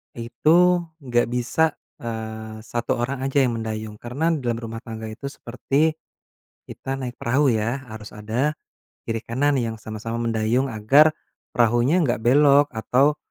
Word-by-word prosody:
itu 160 +10 +3 0.2
enggak 120 -2 +1
bisa, 125 +6 +1 0.2
eee, 110 -1 -6
1 120 +1 -2
orang 125 +3 -2
aja 135 0 +3
yang 120 -2 0
mendayung. 110 -1 -5
Karena 140 +8 -1
dalam 125 -7 -1
rumah 115 -1 -6
tangga 110 -2 -7
itu 120 +5 -7
seperti 140 +4 0 0.8
kita 135 - -5
naik 130 -2 -5
perahu, 135 +4 +2
ya, 115 +4 -1
harus 110 -1 -9
ada 115 +8 -1 0.5
kiri 115 0 -1
kanan 140 +4 +1
yang 115 -3 -1
sama-sama 110 +2 -5
mendayung 115 +3 +1
agar 130 +7 +5 0.5
perahunya 120 +6 +3
enggak 120 -3 0
belok 140 +4 +5
atau, 135 +6 +2
120 Hz, 140 wpm, -23 LUFS, 110-140 Hz, 0.8 s, agar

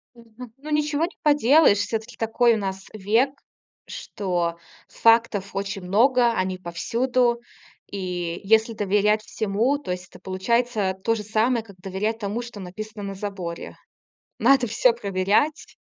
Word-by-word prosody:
Мгм, 230 0 -13
ну 300 +3 -9
ничего 300 +1 +1
не 345 - -5
поделаешь. 290 -5 +5
Все-таки 220 +4 -3
такой 230 +1 +2
у - - 0
нас 195 -2 -4
век, 220 +6 +1 0.6
что 175 -4 -3 0.3
фактов 225 -4 +2
очень 195 0 -3
много, 235 +6 +3
они 185 -3 -1
повсюду, 235 +8 0 0.5
и 180 -3 -4
если 220 +3 +3
доверять 210 +1 +2
всему, 220 +6 0
то 285 - -8
есть 180 0 -4
это - - -15
получается 205 +1 0
то 230 - +2
же 215 - -4
самое, 220 +2 +1
как 200 -4 -15
доверять 195 +4 -3
тому, 210 +2 -3
что 240 -4 -9
написано 205 +3 -8
на 195 0 -5
заборе. 190 -4 -6 0.6
Надо 255 +1 +4
всё 230 +3 +3
проверять. 200 +7 0
215 Hz, 140 wpm, -24 LUFS, 195-240 Hz, 0.6 s, поделаешь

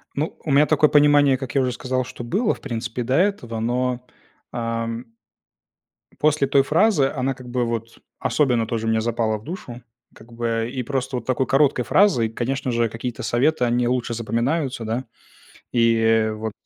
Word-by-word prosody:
Ну, 150 +3 -3
у 150 - -3
меня 140 +2 +5
такое 150 0 +3
понимание, 145 -2 +5
как 135 -2 -7
я 135 - +4
уже 125 - 0
сказал, 130 +1 -2
что 120 -1 -9
было, 205 - 0
в - - -13
принципе, 120 -1 -4
до 130 +3 0
этого, 155 - 0
но, 125 +2 -1 0.5
ам 115 0 -3 1.1
после 150 -2 +2
той 135 0 +4
фразы 155 -2 +3
она 135 0 0
как 125 -1 -13
бы, 125 0 0
вот, 115 0 -5 0.2
особенно 125 -6 +1
тоже 115 -1 -2
мне 110 0 +2
запала 110 -1 0
в 105 - -15
душу. 125 -6 -8 0.3
Как 115 +2 -16
бы 115 -1 -2
и 130 - -3
просто 130 0 -2
вот 120 - -6
такой 130 +1 0
короткой 135 -3 +2
фразой, 150 - +3
конечно 130 +3 -2
же, 115 -1 +1
какие-то 115 +1 -5
советы, 130 +3 +1
они 120 0 +1
лучше 125 -1 -1
запоминаются, 120 +4 -1
да. 120 +4 -2 0.7
И, 115 -2 +3
вот, 110 0 -5
125 Hz, 175 wpm, -22 LUFS, 115-135 Hz, 1.1 s, меня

